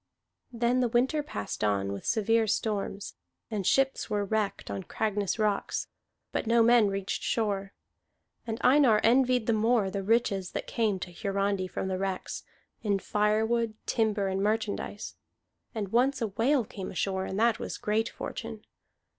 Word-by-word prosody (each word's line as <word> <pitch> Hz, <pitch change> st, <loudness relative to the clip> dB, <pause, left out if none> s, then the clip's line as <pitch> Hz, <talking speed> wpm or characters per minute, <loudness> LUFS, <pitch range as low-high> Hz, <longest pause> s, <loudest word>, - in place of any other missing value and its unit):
Then 240 Hz, +1 st, +1 dB
the 250 Hz, -, +3 dB
winter 255 Hz, +6 st, +2 dB
passed 105 Hz, -, -5 dB
on 100 Hz, -1 st, +1 dB
with 100 Hz, -, -7 dB
severe 225 Hz, 0 st, +2 dB
storms, 205 Hz, -1 st, -2 dB, 0.4 s
and 205 Hz, -4 st, -2 dB
ships 270 Hz, -2 st, +2 dB
were 205 Hz, -1 st, 0 dB
wrecked 210 Hz, -, -2 dB
on 100 Hz, -1 st, -3 dB
Cragness 205 Hz, -, -1 dB
rocks, 210 Hz, -2 st, -1 dB, 0.4 s
but -, -, -2 dB
no 230 Hz, 0 st, +5 dB
men 235 Hz, -2 st, +5 dB
reached 195 Hz, -1 st, -2 dB
shore. 200 Hz, -3 st, -1 dB, 0.8 s
And 225 Hz, 0 st, -2 dB
Einar 255 Hz, -5 st, +5 dB
envied 250 Hz, 0 st, +4 dB
the 230 Hz, -, +2 dB
more 220 Hz, -2 st, +2 dB
the 195 Hz, -, -2 dB
riches 200 Hz, -3 st, +1 dB
that -, -, -3 dB
came 220 Hz, -4 st, 0 dB
to 180 Hz, -1 st, -6 dB
Hiarandi 195 Hz, 0 st, -1 dB
from 190 Hz, -, -4 dB
the 185 Hz, -1 st, -2 dB
wrecks, 190 Hz, -1 st, -3 dB, 0.4 s
in 205 Hz, -2 st, +1 dB
firewood, 215 Hz, +3 st, +1 dB
timber, 215 Hz, -3 st, +1 dB
and 190 Hz, 0 st, -1 dB
merchandise. 210 Hz, 0 st, -2 dB, 0.6 s
And 205 Hz, -3 st, -3 dB
once 260 Hz, +4 st, +2 dB
a 225 Hz, -3 st, -1 dB
whale 240 Hz, +5 st, +2 dB
came 195 Hz, -2 st, -7 dB
ashore, 190 Hz, 0 st, -1 dB
and 190 Hz, -, -3 dB
that 230 Hz, -1 st, +3 dB
was -, -, -5 dB
great 220 Hz, +2 st, 0 dB
fortune. 225 Hz, -2 st, -7 dB
215 Hz, 155 wpm, -29 LUFS, 195-230 Hz, 0.8 s, no